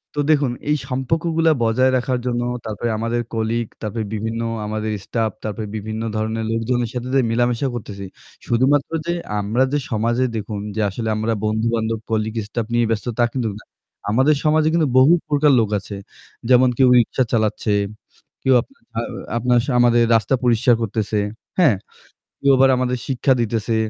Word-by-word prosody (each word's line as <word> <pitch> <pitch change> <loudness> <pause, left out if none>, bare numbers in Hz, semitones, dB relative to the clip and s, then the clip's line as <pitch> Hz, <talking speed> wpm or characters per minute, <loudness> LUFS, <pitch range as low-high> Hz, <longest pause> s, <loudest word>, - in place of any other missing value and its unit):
তো - - -2
দেখুন 140 -4 +2 0.2
এই 150 - +4
সম্পর্কগুলা 160 +5 +1
বজায় 130 +3 +3
রাখার 125 0 -1
জন্য 120 -1 0 0.2
তারপরে 110 +2 -3
আমাদের 115 +2 -1
colleague, 115 0 -1
তারপরে 110 +1 -3
বিভিন্ন 110 +2 -3 0.3
আমাদের 110 0 -3
staff, 110 -2 -1
তারপরে 110 0 -4
বিভিন্ন 110 +1 -4
ধরনের 110 +1 -2
লোকজনের 115 +1 -1
সাথে 125 0 -4
যে 135 - +5
মেলামেশা 120 +3 +1
করতেছি 100 -4 -7 0.4
শুধুমাত্র 135 +5 +2
যে 170 - 0 0.3
আমরা 110 +6 +1
যে 145 - +2
সমাজে 115 +3 +1
দেখুন 105 -1 -4 0.2
যে 110 - 0
আসলে 110 +3 -4
আমরা 110 +1 0
বন্ধু-বান্ধব, 110 +1 0
colleague, 110 0 -1
staff 110 0 -3
নিয়ে 120 0 +3
ব্যস্ত 110 -2 -1
তা - - +5
কিন্তু 125 -4 -1
না। - - -16 0.5
আমাদের 135 +7 +4
সমাজে 155 0 +3
কিন্তু 165 -3 +2
বহু 135 +6 +7 0.2
প্রকার 145 0 +4
লোক 110 -3 +1
আছে। 100 +1 -8 0.5
যেমন 130 0 +6
কেউ 130 - +5
রিকশা 120 +3 +1
চালাচ্ছে, 110 -1 +1 0.7
কেউ 130 - +4
আপনার 275 - -23 0.2
আ - - +2 0.4
আপনার 120 +1 +2
সা - - -2
আমাদের 120 -1 +4
রাস্তা 115 +3 +2
পরিষ্কার 120 0 +4
করতেছে, 110 -1 -1 0.4
হ্যাঁ? 150 - +5 0.6
কেউ 140 - +3
আবার 135 +1 +6
আমাদের 125 0 0
শিক্ষা 130 0 +1
দিতেছে, 115 0 -1
115 Hz, 165 wpm, -20 LUFS, 110-130 Hz, 0.7 s, বহু